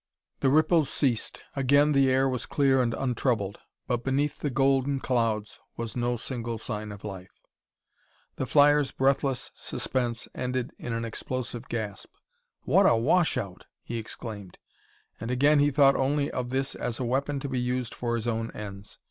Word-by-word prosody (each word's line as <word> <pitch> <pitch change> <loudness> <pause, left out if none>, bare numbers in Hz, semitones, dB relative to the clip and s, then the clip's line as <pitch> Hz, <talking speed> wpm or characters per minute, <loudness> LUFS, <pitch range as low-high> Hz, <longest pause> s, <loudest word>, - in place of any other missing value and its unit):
The 135 - +3
ripples 155 +1 +4
ceased, 125 -6 0
again 140 +2 +4
the 135 -2 +4
air 130 +1 +3
was 125 -2 -2
clear 135 -2 +3
and 115 -2 0
untroubled, 120 -6 -1 0.3
but 120 -1 -1
beneath 140 +2 0
the 145 - -1
golden 135 +1 +2
clouds 115 -5 -1 0.2
was 115 -1 -4
no 120 0 0
single 115 -1 -4
sign 105 0 -4
of 100 -1 -10
life. 95 -3 -7 1.1
The 130 - -2
flyer's 145 0 +5
breathless 135 0 0
suspense 120 -3 -2
ended 125 0 -2
in 120 - -5
an 115 0 -2
explosive 120 +1 -4
gasp. 105 -4 -4 0.5
"What - - +5
a - - +5
washout!" 115 - +1 0.2
he 120 - -4
exclaimed, 110 -3 -7 0.6
and 115 - -5
again 145 +4 +4
he 145 0 +4
thought 140 -1 +5
only 140 +2 +1
of 125 -1 -3
this 135 +1 -1
as 120 -2 -4
a 130 - -1
weapon 140 +3 0
to 140 - -4
be 130 -2 -1
used 125 -1 -2
for 120 -1 -2
his 115 0 -3
own 115 -1 -1
ends. 100 -1 -8
125 Hz, 165 wpm, -27 LUFS, 115-135 Hz, 1.1 s, flyer's